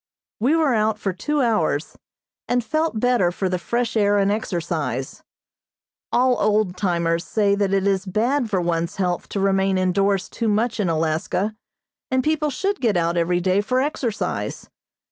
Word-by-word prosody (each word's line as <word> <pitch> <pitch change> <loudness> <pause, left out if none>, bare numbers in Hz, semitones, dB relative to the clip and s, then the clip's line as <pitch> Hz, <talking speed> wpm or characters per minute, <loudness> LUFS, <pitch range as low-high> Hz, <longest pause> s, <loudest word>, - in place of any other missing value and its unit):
We 260 +9 +3
were 310 -5 +2
out 215 -1 +1
for 195 -3 -2
two 295 - -1
hours, 175 -10 0 0.5
and 245 0 +1
felt 310 -3 -1
better 240 -7 +2
for 190 +2 -2
the 180 -1 -1
fresh 235 +5 -2
air 205 -1 +3
and 200 0 +2
exercise. 165 - -3 0.9
All 250 0 +3
old 210 -3 +1
timers 170 -3 0
say 205 -2 +1
that 200 -1 0
it 195 0 +1
is 195 0 0
bad 235 +6 0
for 195 -3 +1
one's 170 -1 -1
health 180 -2 -2
to 200 - -3
remain 195 0 +2
indoors 190 +1 +1
too 230 - -3
much 220 +2 0
in 195 -4 +1
Alaska, 165 +6 -1 0.5
and 260 0 +1
people 305 0 +1
should 390 +8 -2
get 220 -7 +2
out 170 0 +1
every 175 +1 +1
day 185 +2 +2
for 255 +5 0
exercise. 260 -5 -3
200 Hz, 165 wpm, -22 LUFS, 180-240 Hz, 0.9 s, We